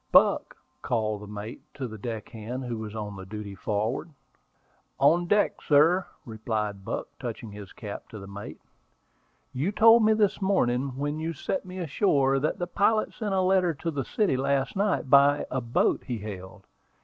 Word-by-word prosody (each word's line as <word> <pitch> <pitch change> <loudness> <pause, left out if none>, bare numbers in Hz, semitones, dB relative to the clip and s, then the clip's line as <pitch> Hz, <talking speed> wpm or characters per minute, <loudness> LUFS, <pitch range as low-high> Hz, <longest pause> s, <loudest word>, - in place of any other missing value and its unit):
"Buck," - - +4 0.2
called 110 -3 -1
the 105 - -9
mate 105 +2 -7
to 130 - -4
the 110 -2 -9
deck 110 -1 -5
hand 115 +3 -6
who 120 -3 -4
was 110 0 -6
on 105 -3 -5
duty 105 -1 -6
forward. 110 - -2 0.9
"On 170 +6 +4
deck, 205 +3 +2
sir," 165 +5 +4 0.2
replied 110 -3 -3
Buck, - - -3
touching 110 - -6
his 100 -1 -10
cap 105 -3 -8
to 110 - -9
the 100 - -9
mate. 100 +1 -8 0.9
"You 145 +10 0
told 225 +2 +7
me 220 0 +5
this 210 -2 +1
morning, 130 -9 +1
when 145 +2 -2
you 165 +1 -2
set 185 +5 -3
me 185 0 -8
ashore, 140 -5 +2
that 150 - -1
the 175 - -2
pilot 210 +4 +1
sent 205 -4 -2
a 190 - +3
letter 185 -3 +3
to 165 +4 -3
the 140 -3 -2
city 190 - +1
last 135 0 0
night 200 -6 +1
by 140 +1 +5
a 130 - -1
boat 115 0 +1
he 120 - -2
hailed." 100 -3 -8
135 Hz, 175 wpm, -27 LUFS, 110-175 Hz, 0.9 s, told